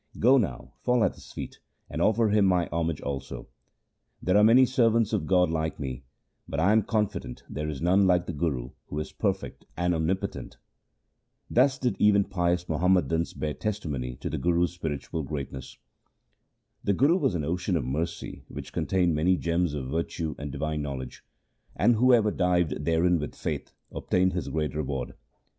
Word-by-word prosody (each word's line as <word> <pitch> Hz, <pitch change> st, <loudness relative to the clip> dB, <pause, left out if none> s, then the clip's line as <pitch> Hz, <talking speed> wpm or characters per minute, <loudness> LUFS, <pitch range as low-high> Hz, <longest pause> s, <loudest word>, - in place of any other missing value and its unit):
Go 130 Hz, +4 st, +5 dB
now, 105 Hz, -, -3 dB
fall 125 Hz, -2 st, +2 dB
at 95 Hz, -, +2 dB
his -, -, -14 dB
feet, -, -, -7 dB, 0.3 s
and -, -, -4 dB
offer 110 Hz, 0 st, +3 dB
him 105 Hz, 0 st, +4 dB
my 90 Hz, -3 st, +2 dB
homage 85 Hz, -1 st, -1 dB
also. 70 Hz, -1 st, -5 dB, 0.7 s
There 90 Hz, -, +1 dB
are 105 Hz, -, +6 dB
many 120 Hz, +4 st, +7 dB
servants 115 Hz, -3 st, +2 dB
of 105 Hz, -, 0 dB
God 90 Hz, -3 st, +3 dB
like 80 Hz, 0 st, -2 dB
me, 65 Hz, -2 st, -5 dB, 0.4 s
but 70 Hz, -, -3 dB
I 90 Hz, +5 st, +4 dB
am 110 Hz, +1 st, +5 dB
confident 105 Hz, -, -2 dB
there 75 Hz, +2 st, -4 dB
is 75 Hz, 0 st, -5 dB
none 95 Hz, +3 st, +4 dB
like 90 Hz, -1 st, +3 dB
the 85 Hz, -, -4 dB
Guru 70 Hz, -5 st, -2 dB, 0.2 s
who 75 Hz, -, -6 dB
is 75 Hz, -, -4 dB
perfect -, -, -3 dB
and 90 Hz, +1 st, +1 dB
omnipotent.' 85 Hz, +4 st, -2 dB, 0.9 s
Thus 130 Hz, +2 st, +4 dB
did 125 Hz, -6 st, -1 dB
even 100 Hz, -1 st, +5 dB
pious 90 Hz, -2 st, -1 dB
Muhammadans 85 Hz, 0 st, +1 dB
bear 75 Hz, -1 st, -3 dB
testimony 75 Hz, -, -3 dB
to -, -, -5 dB
the -, -, -2 dB
Guru's 85 Hz, 0 st, +1 dB
spiritual 80 Hz, -2 st, -4 dB
greatness. 65 Hz, -3 st, -6 dB, 1.1 s
The 100 Hz, -, +2 dB
Guru 145 Hz, -, +4 dB
was 135 Hz, -, +1 dB
an 75 Hz, -4 st, -1 dB
ocean 90 Hz, +3 st, 0 dB
of 70 Hz, -, -2 dB
mercy 80 Hz, +6 st, -4 dB
which -, -, -8 dB
contained 90 Hz, -3 st, +1 dB
many 90 Hz, +5 st, +2 dB
gems 85 Hz, -2 st, 0 dB
of 65 Hz, -2 st, -5 dB
virtue 80 Hz, 0 st, -2 dB
and 70 Hz, 0 st, -5 dB
divine 75 Hz, +2 st, -2 dB
knowledge; 65 Hz, -3 st, -6 dB, 0.5 s
and 115 Hz, +5 st, +4 dB
whoever 115 Hz, -2 st, +4 dB
dived 90 Hz, -5 st, 0 dB
therein 85 Hz, +2 st, +3 dB
with 75 Hz, -, -5 dB
faith -, -, -4 dB, 0.2 s
obtained 95 Hz, 0 st, +1 dB
his 90 Hz, -, -3 dB
great 75 Hz, -1 st, -2 dB
reward. 70 Hz, -4 st, -3 dB
85 Hz, 170 wpm, -27 LUFS, 75-100 Hz, 1.1 s, many